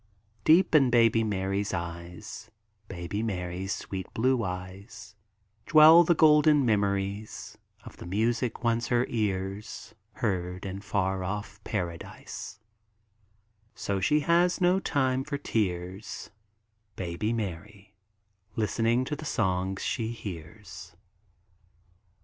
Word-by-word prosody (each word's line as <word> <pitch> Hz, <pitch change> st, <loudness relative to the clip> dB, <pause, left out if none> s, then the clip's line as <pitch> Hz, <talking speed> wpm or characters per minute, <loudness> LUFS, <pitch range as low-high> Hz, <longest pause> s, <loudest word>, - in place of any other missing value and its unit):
Deep 170 Hz, +3 st, +5 dB
in 140 Hz, -5 st, +6 dB
baby 115 Hz, -2 st, +4 dB
Mary's 100 Hz, -1 st, -1 dB
eyes, 85 Hz, 0 st, -7 dB, 0.4 s
Baby 90 Hz, +2 st, -4 dB
Mary's 95 Hz, -3 st, -3 dB
sweet 95 Hz, -2 st, -5 dB
blue 125 Hz, +1 st, +2 dB
eyes, 100 Hz, +3 st, -7 dB, 0.5 s
Dwell 160 Hz, +2 st, +9 dB
the 170 Hz, +1 st, +3 dB
golden 150 Hz, -2 st, +5 dB
memories 100 Hz, -1 st, -1 dB, 0.3 s
Of -, -, -12 dB
the -, -, -9 dB
music 115 Hz, +6 st, -1 dB
once 115 Hz, 0 st, +1 dB
her 120 Hz, 0 st, +2 dB
ears 100 Hz, -2 st, -3 dB, 0.2 s
Heard 90 Hz, -1 st, -2 dB
in 95 Hz, 0 st, -5 dB
far 95 Hz, -2 st, -1 dB
off 105 Hz, +2 st, -5 dB
Paradise; 90 Hz, +1 st, -5 dB, 1.2 s
So 100 Hz, -1 st, -2 dB
she 150 Hz, +11 st, +2 dB
has 175 Hz, +3 st, +3 dB
no 180 Hz, +1 st, +3 dB
time 130 Hz, -6 st, 0 dB
for 145 Hz, 0 st, -3 dB
tears, 95 Hz, -6 st, -3 dB, 0.6 s
Baby 90 Hz, +4 st, -2 dB
Mary, 100 Hz, -1 st, -5 dB, 0.6 s
Listening 115 Hz, +3 st, +1 dB
to 150 Hz, -, -3 dB
the 155 Hz, -, -9 dB
songs 95 Hz, -7 st, -1 dB
she 115 Hz, -, -1 dB
hears. 90 Hz, -4 st, -8 dB
105 Hz, 110 wpm, -28 LUFS, 95-120 Hz, 1.2 s, Dwell